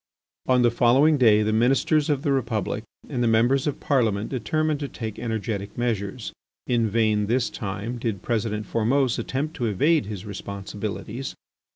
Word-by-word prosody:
On 125 Hz, -1 st, +4 dB
the 120 Hz, -, +4 dB
following 135 Hz, +6 st, +4 dB
day 110 Hz, -4 st, +5 dB
the 110 Hz, +1 st, 0 dB
Ministers 135 Hz, +6 st, +2 dB
of 145 Hz, -2 st, 0 dB
the 145 Hz, -, +1 dB
Republic 110 Hz, -5 st, -1 dB, 0.2 s
and 125 Hz, -4 st, -3 dB
the 120 Hz, -, +2 dB
Members 120 Hz, +5 st, +3 dB
of 145 Hz, -, -2 dB
Parliament 110 Hz, -6 st, +1 dB
determined 145 Hz, +5 st, -1 dB
to 145 Hz, -, -3 dB
take 110 Hz, -5 st, -6 dB
energetic 110 Hz, -3 st, -3 dB
measures. 110 Hz, -2 st, -2 dB, 0.3 s
In 115 Hz, -3 st, +1 dB
vain, 105 Hz, -1 st, +2 dB
this 120 Hz, +2 st, +1 dB
time, 105 Hz, +4 st, -4 dB
did 110 Hz, -6 st, -3 dB
President 110 Hz, -2 st, -1 dB
Formose 125 Hz, +3 st, +1 dB
attempt 150 Hz, +5 st, -3 dB
to 120 Hz, -, 0 dB
evade 145 Hz, -, +2 dB
his 105 Hz, -1 st, -6 dB
responsibilities. 105 Hz, +4 st, -6 dB
115 Hz, 160 wpm, -24 LUFS, 105-130 Hz, 0.3 s, day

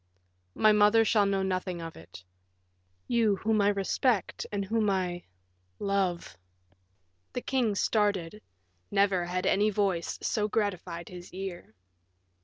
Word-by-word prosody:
My 215 Hz, -, +5 dB
mother 210 Hz, +2 st, +5 dB
shall 210 Hz, -2 st, +3 dB
know 195 Hz, -1 st, 0 dB
nothing 185 Hz, -1 st, -2 dB
of 165 Hz, -1 st, -7 dB
it; 85 Hz, +2 st, -13 dB, 0.8 s
you 225 Hz, -4 st, +2 dB
whom 215 Hz, +2 st, +1 dB
I 200 Hz, -, +3 dB
respect, 205 Hz, +2 st, 0 dB
and 200 Hz, -1 st, -2 dB
whom 215 Hz, +1 st, +1 dB
I 180 Hz, -2 st, -1 dB, 0.5 s
love 190 Hz, -, -1 dB, 0.5 s
" 90 Hz, -1 st, -45 dB
The 250 Hz, -, -3 dB
king 245 Hz, -6 st, 0 dB
started; 205 Hz, -2 st, 0 dB, 0.5 s
never 195 Hz, -3 st, +2 dB
had 180 Hz, +1 st, -2 dB
any 205 Hz, +2 st, +3 dB
voice 195 Hz, -5 st, -1 dB
so 210 Hz, -2 st, 0 dB
gratified 185 Hz, -5 st, -2 dB
his 180 Hz, -1 st, -10 dB
ear. 185 Hz, -, -7 dB
195 Hz, 130 wpm, -29 LUFS, 175-210 Hz, 0.8 s, My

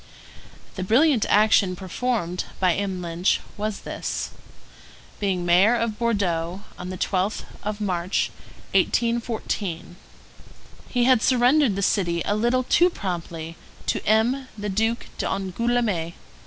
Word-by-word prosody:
The 185 Hz, -, -2 dB
brilliant 245 Hz, +4 st, +3 dB
action 205 Hz, -3 st, +4 dB
performed 190 Hz, -1 st, -2 dB
by 185 Hz, -2 st, +3 dB
M. 190 Hz, -1 st, -3 dB
Lynch 170 Hz, +2 st, +1 dB, 0.2 s
was 210 Hz, -1 st, -3 dB
this: -, -, -4 dB, 0.9 s
being 190 Hz, -4 st, -1 dB
mayor 185 Hz, +7 st, +5 dB
of 230 Hz, -2 st, -2 dB
Bordeaux, 190 Hz, -5 st, -1 dB, 0.2 s
on 180 Hz, -, -6 dB
the 185 Hz, -, -5 dB
12th 190 Hz, +3 st, -1 dB, 0.2 s
of 210 Hz, 0 st, -4 dB
March, 185 Hz, -3 st, -1 dB, 0.4 s
1814, 220 Hz, -7 st, -1 dB, 0.9 s
he 245 Hz, -1 st, +1 dB
had 255 Hz, -2 st, +5 dB
surrendered 255 Hz, -1 st, +4 dB
the 200 Hz, -, -2 dB
city 170 Hz, -4 st, +1 dB
a -, -, +1 dB
little 240 Hz, +4 st, +2 dB
too 350 Hz, +7 st, +4 dB
promptly 170 Hz, -, -5 dB, 0.3 s
to -, -, -1 dB
M. 240 Hz, +5 st, +2 dB
the 205 Hz, 0 st, -3 dB
Duke 225 Hz, +4 st, 0 dB
d'Angoulême. 195 Hz, -3 st, -1 dB
205 Hz, 120 wpm, -24 LUFS, 180-235 Hz, 0.9 s, mayor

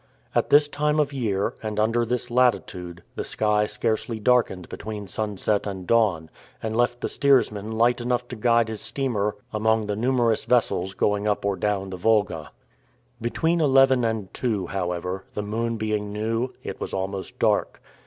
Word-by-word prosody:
At -, -, +1 dB
this 145 Hz, +1 st, +6 dB
time 150 Hz, +1 st, 0 dB
of 145 Hz, -1 st, +1 dB
year, 105 Hz, -7 st, -1 dB
and 110 Hz, -1 st, -3 dB
under 115 Hz, +2 st, +2 dB
this 120 Hz, +1 st, -2 dB
latitude, 90 Hz, -8 st, 0 dB
the -, -, -4 dB
sky 105 Hz, 0 st, +1 dB
scarcely 110 Hz, +1 st, -2 dB
darkened 110 Hz, -6 st, +2 dB
between 105 Hz, -2 st, -6 dB
sunset 105 Hz, +1 st, -1 dB
and 95 Hz, -2 st, -5 dB
dawn, 95 Hz, -8 st, +2 dB, 0.3 s
and 110 Hz, 0 st, -2 dB
left 120 Hz, +1 st, +1 dB
the -, -, -1 dB
steersman 125 Hz, -7 st, +2 dB
light 120 Hz, +2 st, +2 dB
enough 125 Hz, 0 st, -1 dB
to 125 Hz, -, -5 dB
guide 115 Hz, 0 st, +3 dB
his 110 Hz, -1 st, -5 dB
steamer 110 Hz, -4 st, -1 dB, 0.2 s
among 110 Hz, 0 st, +2 dB
the 105 Hz, 0 st, -2 dB
numerous 120 Hz, -1 st, +1 dB
vessels 95 Hz, -6 st, +1 dB
going 105 Hz, 0 st, +1 dB
up 105 Hz, -1 st, 0 dB
or 100 Hz, -1 st, +1 dB
down 95 Hz, -1 st, -1 dB
the 95 Hz, -, -5 dB
Volga. 100 Hz, -6 st, +1 dB, 0.7 s
Between 160 Hz, +8 st, +1 dB
eleven 135 Hz, -3 st, +5 dB
and 110 Hz, -4 st, -2 dB
two, 110 Hz, -7 st, -1 dB
however, 90 Hz, 0 st, -3 dB
the 105 Hz, -, -2 dB
moon 115 Hz, +2 st, -2 dB
being 105 Hz, -1 st, -2 dB
new, 115 Hz, +4 st, -1 dB
it -, -, -6 dB
was -, -, -3 dB
almost 95 Hz, 0 st, -4 dB
dark. -, -, +1 dB
110 Hz, 165 wpm, -24 LUFS, 100-120 Hz, 0.7 s, this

